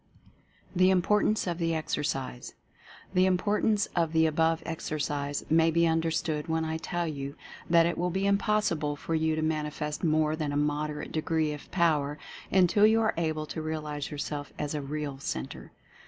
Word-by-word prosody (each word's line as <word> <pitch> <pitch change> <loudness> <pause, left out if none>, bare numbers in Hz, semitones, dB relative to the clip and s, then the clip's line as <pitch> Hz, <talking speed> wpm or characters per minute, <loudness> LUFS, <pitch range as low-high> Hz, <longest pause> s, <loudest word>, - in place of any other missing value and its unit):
THE 185 +1 +5
IMPORTANCE 210 +3 +2
OF 175 -1 -2
THE 165 -1 0
EXERCISE, 135 -5 -3 0.6
The 185 0 +4
importance 205 +2 +2
of 165 -2 +1
the 160 0 +4
above 160 +1 +1
exercise 145 -3 -3
may 160 +1 +4
be 170 +1 +3
un 165 0 +2
derstood 160 -1 -1
when 160 0 0
I 160 0 -2
tell 175 +2 -2
you 140 -3 -5 0.3
that 165 -1 +6
it 170 - -1
will 180 +1 +1
be 190 +3 -1
impossible 200 -7 +1
for 165 - -5
you 160 0 +1
to 155 - -1
manifest 150 -1 -2
more 155 -1 +2
than 155 -2 -2
a 145 - -1
moderate 150 0 -1
degree 155 -1 0
of 145 - -10
Power 150 -5 +1 0.3
until 190 +3 +5
you 220 +1 +4
are 220 -1 +2
able 155 -2 -1
to 160 - -5
realize 150 -2 -4
yourself 145 0 -5
as 150 0 -3
a 150 - -2
real 145 -1 -4
Centre. 65 - -5
160 Hz, 170 wpm, -29 LUFS, 150-170 Hz, 0.6 s, that